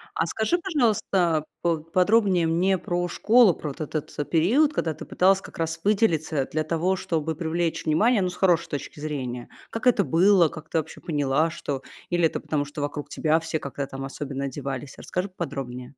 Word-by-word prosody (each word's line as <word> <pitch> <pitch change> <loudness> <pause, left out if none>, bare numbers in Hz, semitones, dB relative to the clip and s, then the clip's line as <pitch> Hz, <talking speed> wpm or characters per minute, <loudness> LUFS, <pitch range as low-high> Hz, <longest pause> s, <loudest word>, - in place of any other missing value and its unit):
А 160 - +1
скажи, 220 - 0
пожалуйста, 210 - +1 0.2
поподробнее 180 +3 +2
мне 180 +4 +2
про 175 0 -2
школу, 220 +2 +5
про 150 - -6
вот 145 +3 -8
этот, 155 0 -4
э, 145 - -1
период, 235 - +3
когда 160 - -1
ты - - -9
пыталась 190 +1 +3
как - - -12
раз 165 0 -2
выделиться 165 -9 +2
для 155 0 0
того, 170 +4 0
чтобы 160 -3 -2
привлечь 165 0 -2
внимание, 210 +8 +3
ну, 185 - +1
с 180 - -8
хорошей 175 -3 +3
точки 145 0 -6
зрения. 130 -5 -4 0.2
Как 225 +3 -3
это 220 -5 +5
было? 175 0 +4
Как 155 - -11
ты - - -1
вообще 160 0 -4
поняла, 145 0 +1
что 140 -4 -4 0.3
Или 175 -1 +2
это 160 - 0
потому, 145 -2 -2
что 145 +1 -7
вокруг 145 0 -4
тебя 160 0 +1
все 160 -1 -3
как-то 140 0 -4
там 135 0 -7
особенно 140 0 -5
одевались? 135 0 -5
Расскажи 180 +2 -3
поподробнее. 130 -7 -5
165 Hz, 185 wpm, -25 LUFS, 145-185 Hz, 0.3 s, школу